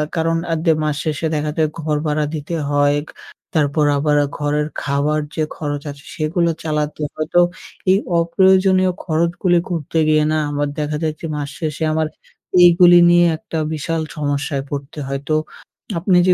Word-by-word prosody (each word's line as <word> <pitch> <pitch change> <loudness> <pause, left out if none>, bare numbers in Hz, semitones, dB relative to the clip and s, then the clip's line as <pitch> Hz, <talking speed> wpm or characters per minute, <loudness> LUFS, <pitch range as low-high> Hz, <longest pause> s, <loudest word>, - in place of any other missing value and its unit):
কারণ 165 0 +1
আ - - +2
দে 165 - +5
মাস 150 -1 0
শেষে 155 +1 -1
দেখা 150 0 -1
যায় 155 -1 +2
ঘর 155 -1 -1
ভাড়া 150 0 0
দিতে 155 +3 -4
হয়, 145 0 +3 0.6
তারপর 150 -1 +2
আবার 150 +1 +1 0.2
ঘরের 150 0 0
খাবার 145 +2 0 0.2
যে 155 - 0
খরচ 145 -2 -3
আছে, 140 -1 -14
সেগুলো 170 +2 0
চালাতে 150 -1 -2
হয় 155 0 -3
তো 175 - +7 0.5
এই 190 - +5 0.2
অপ্রয়োজনীয় 185 +2 +3
খরচগুলি 170 +2 +1
করতে 165 -2 -3
গিয়ে 155 0 +4
না 155 - +1
আমার 145 0 -1
দেখা 150 0 -2
যাচ্ছে, 155 +1 -3
মাস 145 -1 -4
শেষে 155 0 -3
আমার 155 0 0 0.6
এইগুলি 175 0 +7
নিয়ে 175 0 +5
একটা 165 - -6 0.2
বিশাল 160 +2 -2 0.2
সমস্যায় 145 -1 -2
পড়তে 140 +1 -6
হয়। 135 0 -3
তো 155 - +3 0.6
আপনি 185 +1 +3
যে 180 - +6
155 Hz, 160 wpm, -19 LUFS, 145-170 Hz, 0.6 s, তো